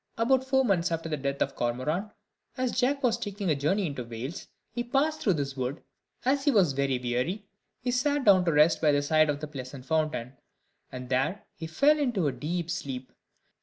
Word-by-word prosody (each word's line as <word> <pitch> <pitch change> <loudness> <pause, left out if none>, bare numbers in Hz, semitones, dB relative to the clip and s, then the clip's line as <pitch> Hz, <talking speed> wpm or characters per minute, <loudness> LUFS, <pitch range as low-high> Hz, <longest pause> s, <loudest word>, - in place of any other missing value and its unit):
About 255 +3 +3
four 265 0 +2
months 180 -5 +1
after 165 0 -2
the 155 - 0
death 140 -1 -1
of 135 - -5
Cormoran, 130 - -1 0.5
as 255 -1 0
Jack 275 +3 +1
was 235 -2 +2
taking 200 -5 -2
a - - +3
journey 185 +9 +1
into 140 -6 -4
Wales, 120 +7 -6 0.2
he 240 +1 -3
passed 280 +6 0
through 195 - +3
this 140 -2 -3
wood; 130 +1 -2 0.5
and, 260 - +4
as - - -9
he 290 - +3
was 190 - +4
very 135 -1 0
weary, 125 - -2 0.4
he 245 - -1
sat 285 +3 +1
down 190 -3 +6
to 170 - +3
rest 150 +2 +4
by 150 - +4
the 145 0 +2
side 155 +1 +3
of 145 +1 -2
a - - -2
pleasant 130 -2 -8
fountain, 155 -5 -1 0.6
and 125 0 -7
there 135 +9 0
he 165 -5 -7
fell 290 - +3
into 240 - 0
a 145 - +2
deep 165 +6 -3
sleep. 130 -6 -5
160 Hz, 205 wpm, -28 LUFS, 140-230 Hz, 0.6 s, down